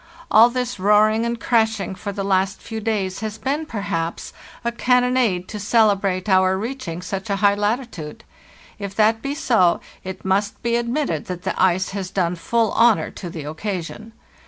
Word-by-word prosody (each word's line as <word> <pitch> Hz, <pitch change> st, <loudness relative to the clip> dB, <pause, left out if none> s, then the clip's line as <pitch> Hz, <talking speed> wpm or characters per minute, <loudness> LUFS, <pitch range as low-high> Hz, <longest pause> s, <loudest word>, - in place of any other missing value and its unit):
All 225 Hz, +2 st, +7 dB
this 245 Hz, -4 st, -3 dB
roaring 215 Hz, +3 st, +4 dB
and 235 Hz, 0 st, -3 dB
crashing 220 Hz, -5 st, +1 dB
for 200 Hz, +2 st, -5 dB
the 195 Hz, 0 st, -4 dB
last 195 Hz, 0 st, +1 dB
few 225 Hz, -1 st, -6 dB
days 205 Hz, -4 st, -2 dB
has 220 Hz, -1 st, -4 dB
been, 280 Hz, +8 st, -2 dB
perhaps, 200 Hz, -, -3 dB, 0.3 s
a 235 Hz, -, +1 dB
can 250 Hz, +1 st, +2 dB
nonade 235 Hz, -8 st, +1 dB
to 210 Hz, -, -5 dB
celebrate 200 Hz, -3 st, +2 dB
our 190 Hz, -1 st, +3 dB
reaching 205 Hz, -6 st, -5 dB
such 195 Hz, +3 st, -5 dB
a 200 Hz, -, +1 dB
high 200 Hz, +1 st, +4 dB
latitude. 210 Hz, -, -3 dB, 0.6 s
If 200 Hz, -1 st, -6 dB
that 220 Hz, +1 st, +3 dB
be 280 Hz, +1 st, -3 dB
so, 220 Hz, -, +3 dB, 0.2 s
it 190 Hz, 0 st, -7 dB
must 200 Hz, +2 st, 0 dB
be 235 Hz, 0 st, +1 dB
admitted 235 Hz, -, -1 dB
that 180 Hz, -1 st, -6 dB
the -, -, -1 dB
ice 185 Hz, 0 st, +2 dB
has 195 Hz, -2 st, -4 dB
done 180 Hz, -2 st, 0 dB
full 225 Hz, +6 st, 0 dB
honor 230 Hz, -1 st, +3 dB
to 180 Hz, -, -7 dB
the 165 Hz, -3 st, -7 dB
occasion. 185 Hz, +7 st, -5 dB
205 Hz, 175 wpm, -21 LUFS, 190-230 Hz, 0.6 s, All